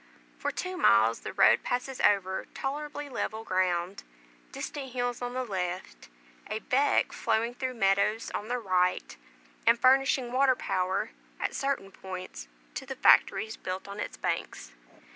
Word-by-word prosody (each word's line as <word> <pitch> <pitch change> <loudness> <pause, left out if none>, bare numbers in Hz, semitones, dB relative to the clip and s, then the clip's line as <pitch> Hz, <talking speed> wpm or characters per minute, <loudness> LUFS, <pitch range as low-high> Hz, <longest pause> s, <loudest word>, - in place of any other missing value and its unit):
For - - -1
two 370 0 -4
miles 110 - +4
the - - -6
road 190 0 +5
passes 250 +1 -3
over 190 -2 +2
tolerably 290 +1 -4
level 225 -4 -3
ground, 185 -1 0 0.5
distant 270 -4 -6
hills 245 -1 -2
on 245 0 -4
the 255 - -1
left, 180 - -4 0.4
a 215 - -1
"beck" 270 +5 +2
flowing 230 +1 0
through 255 0 -4
meadows 200 +1 +1
on 210 - -3
the 245 +1 -1
right, 185 -5 0 0.5
and 230 0 +6
furnishing 260 -1 +4
water 260 0 +4
power, 185 - -1 0.3
at - - -2
certain 275 -8 -2
points, 185 - -8 0.3
to - - -6
the - - -5
factories 220 0 +4
built 185 +1 -5
on 200 +1 -7
its - - -5
banks. - - -3
220 Hz, 145 wpm, -29 LUFS, 185-255 Hz, 0.5 s, and